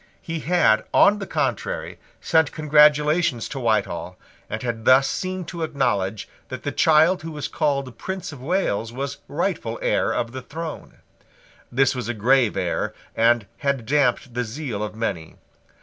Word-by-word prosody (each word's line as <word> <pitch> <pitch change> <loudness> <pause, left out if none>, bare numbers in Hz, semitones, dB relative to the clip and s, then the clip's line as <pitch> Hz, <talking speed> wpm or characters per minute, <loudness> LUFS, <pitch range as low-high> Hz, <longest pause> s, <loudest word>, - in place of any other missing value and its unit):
He 165 -1 -4
had, 150 -10 +3
on 205 +1 +6
the 195 - -5
contrary, - - -2 0.2
sent 160 -3 +2
congratulations 150 -3 +3
to 135 - -5
Whitehall, 115 -3 -1 0.3
and 110 +2 -4
had 115 -2 -3
thus 130 +1 +6
seemed 185 +2 -3
to 170 -2 -6
acknowledge 110 -10 -1 0.2
that - - -7
the - - -2
child 160 +4 +4
who 165 - -6
was 150 -2 -4
called 140 -5 -1
Prince 190 -3 -5
of 140 -4 -11
Wales 130 - -1
was 135 +3 -4
rightful - - -2
heir - - +1
of 115 -1 -2
the 130 +1 -6
throne. 160 +3 -7 0.8
This 135 +2 +3
was 125 -3 -4
a 120 - -2
grave 120 +1 +3
error, - - -2 0.2
and 115 -1 +3
had 140 -5 -1
damped 135 -1 +1
the 125 +1 -1
zeal 120 -2 -5
of 105 0 -4
many. 100 -8 -4
135 Hz, 160 wpm, -23 LUFS, 115-160 Hz, 0.8 s, on